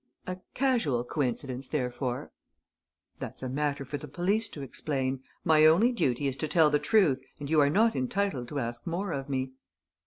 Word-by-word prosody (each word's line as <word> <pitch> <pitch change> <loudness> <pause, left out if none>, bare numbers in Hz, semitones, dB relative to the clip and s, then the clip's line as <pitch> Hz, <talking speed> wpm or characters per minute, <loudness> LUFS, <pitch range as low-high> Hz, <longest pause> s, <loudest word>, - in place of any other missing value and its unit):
"A 185 0 -4 0.2
casual 235 - +1
coincidence, 130 0 -2
therefore?" 125 -3 -2 0.9
"That's - - -7
a 130 - -2
matter 140 +1 -1
for 145 +2 -4
the 150 - -8
police 195 +9 0
to 145 - -7
explain. 135 -1 -2 0.2
My 155 -2 +5
only 195 +11 +5
duty 145 - 0
is 135 -2 0
to 155 - -2
tell 155 0 +4
the 150 - +3
truth 180 -12 +3 0.2
and 145 +1 -5
you 155 -2 +5
are 140 - +4
not 220 +8 +3
entitled 130 0 -1
to 145 - -5
ask 120 +2 -4
more 175 +3 -2
of 140 -2 -4
me." 130 -1 -1
145 Hz, 180 wpm, -29 LUFS, 130-175 Hz, 0.9 s, My